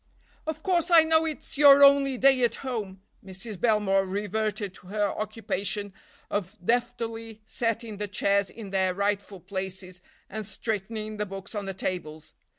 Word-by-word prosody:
"Of 315 0 -4
course 355 -2 +2
I 335 -2 +8
know 320 0 +3
it's 305 -2 -5
your 285 -1 +9
only 275 -1 +6
day 265 0 +5
at 240 - +2
home—" 205 -7 -4 0.2
Mrs. 190 +1 -8
Belmore 210 -4 +3
reverted 205 +1 -2
to 180 - -16
her 205 +1 0
occupation 205 -2 -3 0.4
of 205 0 -3
deftly 230 -2 -2
setting 230 -1 -2
the 210 0 -3
chairs 200 0 +1
in 210 -4 -9
their 190 -1 +1
rightful 200 -1 -2
places, 190 -1 -6 0.3
and 215 +2 -5
straightening 215 +1 -4
the 210 0 -2
books 195 +2 -8
on 205 -2 -3
the 195 - -4
tables. 160 -5 -5
210 Hz, 155 wpm, -27 LUFS, 195-235 Hz, 0.4 s, your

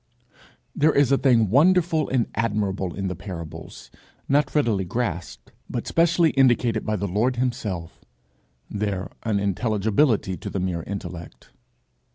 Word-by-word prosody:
There 155 +2 +4
is 140 -2 +4
a 135 - +5
thing 115 -7 +3
wonderful 165 +2 +3
and 130 -3 +1
admirable 100 -5 -1
in 95 0 -3
the 90 - -3
parables, 85 -3 -9 0.4
not 145 +1 +1
readily 115 -10 +2
grasped, 85 - -4 0.2
but - - -3
specially 170 -1 +3
indicated 120 -4 +2
by 110 - +1
the 100 0 -2
Lord 115 +7 +1
himself 115 -9 -3 0.6
their 100 -2 -3
unintelligibility 105 +1 +1
to - - -6
the 95 - -3
mere 90 -2 -2
intellect. 90 -2 -8
105 Hz, 130 wpm, -24 LUFS, 95-130 Hz, 0.6 s, a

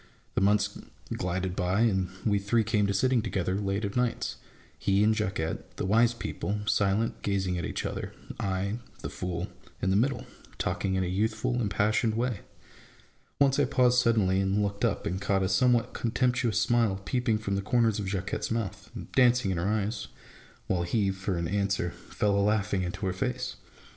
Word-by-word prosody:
The - - 0
months 100 +1 +2 0.3
glided 90 0 -2
by, 95 +3 +1
and 95 -6 +2 0.2
we 100 -2 +3
three 110 +3 +2
came 105 -1 +1
to - - +1
sitting 125 +4 +3
together 95 -4 -1
late 100 +1 -1
of 100 - -4
nights: 125 -1 0 0.4
he 100 +1 +3
and 110 +1 +4
Jacquette, 95 -6 -3
the - - -2
wise 115 +4 +4
people, 105 -2 -3
silent, 105 +1 +1
gazing 95 -2 0
at 85 - -3
each - - -3
other; - - -4 0.3
I, 100 +3 -1 0.2
the - - -5
fool, 90 0 -3 0.3
in 95 - +1
the - - +3
middle, 130 +6 +1 0.3
talking 95 +2 -1
in 95 - +1
a - - -1
youthful, 110 +6 0
impassioned 110 +1 +1
way. 120 -3 -1 1.0
Once 140 0 +4
I 145 - +4
paused 125 -2 +4
suddenly, 110 -6 +3
and 100 +2 +1
looked 100 0 -3
up, - - +1
and 95 +3 -2
caught 100 -1 +1
a - - +2
somewhat 120 +4 +3
contemptuous 125 -1 +1
smile 115 -5 +2
peeping 125 -4 +1
from 105 -2 -3
the 100 - 0
corners 115 0 +2
of 100 - -3
Jacquette's 95 0 -2
mouth 115 -4 -3
and - - -8
dancing 125 -5 +4
in 90 - -1
her 85 +3 0
eyes; 105 +2 -1 0.6
while 90 -2 0
he, 95 +3 +1
for 95 -1 -3
an 85 -1 -1
answer, 100 -2 0
fell 105 -1 -1
a 110 - +4
Iaughing 100 -2 -1
into 90 +3 -3
her 95 - 0
face. 125 +5 -2
100 Hz, 185 wpm, -28 LUFS, 95-115 Hz, 1.0 s, and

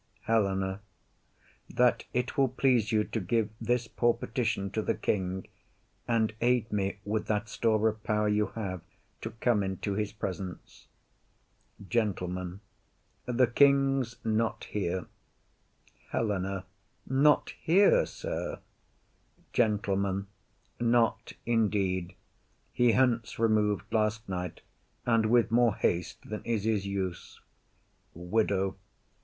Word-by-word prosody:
HELENA. 95 -3 +1 0.9
That 125 0 +2
it 125 0 -1
will 135 -2 +4
please 125 -4 +2
you 110 -1 +3
To 110 - -3
give 110 +3 0
this 120 +1 0
poor 120 0 +2
petition 110 -5 -2
to 110 - -1
the - - 0
king, 95 -2 -2 0.6
And 110 -2 +1
aid 120 -2 +2
me 100 -1 -1
with 105 +1 -1
that 105 +1 0
store 110 -1 +2
of 110 0 -2
power 105 0 +1
you 105 0 +2
have 95 -6 -4 0.4
To - - -4
come 115 -1 +1
into 95 +1 -2
his 105 0 -1
presence. 95 -3 -6 1.0
GENTLEMAN. 90 -4 -2 0.7
The 125 +1 +4
king's 135 -1 +3
not 110 0 0
here. 95 -3 -2 1.0
HELENA. 100 -3 -1 0.4
Not 140 +3 +3
here, 200 - +5
sir? - - -4 1.0
GENTLEMAN. 100 -4 +1 0.5
Not 120 -1 +2
indeed. 100 -6 0 0.6
He 120 -2 +4
hence 120 -3 +1
remov'd 105 -2 +2
last 110 0 +1
night, 90 -2 -4 0.4
and 115 -2 +3
with 115 0 +3
more 120 -2 +4
haste 90 +1 -1
Than 105 0 -5
is 115 -4 -1
his 105 -3 0
use. 95 -3 -4 0.8
WIDOW. 95 +2 0
110 Hz, 115 wpm, -29 LUFS, 100-120 Hz, 1.0 s, here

